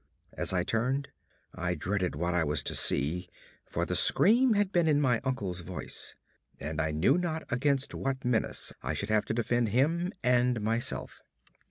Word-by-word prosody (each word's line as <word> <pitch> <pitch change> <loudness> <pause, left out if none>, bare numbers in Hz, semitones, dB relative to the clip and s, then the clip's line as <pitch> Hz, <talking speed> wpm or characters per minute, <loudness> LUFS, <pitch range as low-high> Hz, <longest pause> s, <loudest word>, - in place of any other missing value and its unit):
As - - -2
I 90 -1 +1
turned, 130 +7 -1 0.4
I 90 0 -2
dreaded 95 +2 -1
what 85 +3 -1
I 85 -1 +2
was 75 -2 -1
to - - 0
see; 85 +6 0 0.4
for - - -1
the - - -3
scream 235 +4 +4
had 205 -2 +1
been 175 -3 +2
in 150 -2 +4
my 125 -5 +2
uncle's 100 -9 -2
voice, 80 - -6 0.4
and 75 +2 -3
I 80 - 0
knew 90 - +3
not 160 -2 -2
against 140 +2 +1
what 135 -1 -3
menace 120 -3 0
I - - -2
should 100 - -3
have 110 -1 +2
to - - -2
defend 120 0 +1
him 165 - +1
and 125 -1 +3
myself. 115 +2 -2
120 Hz, 175 wpm, -30 LUFS, 90-140 Hz, 0.4 s, scream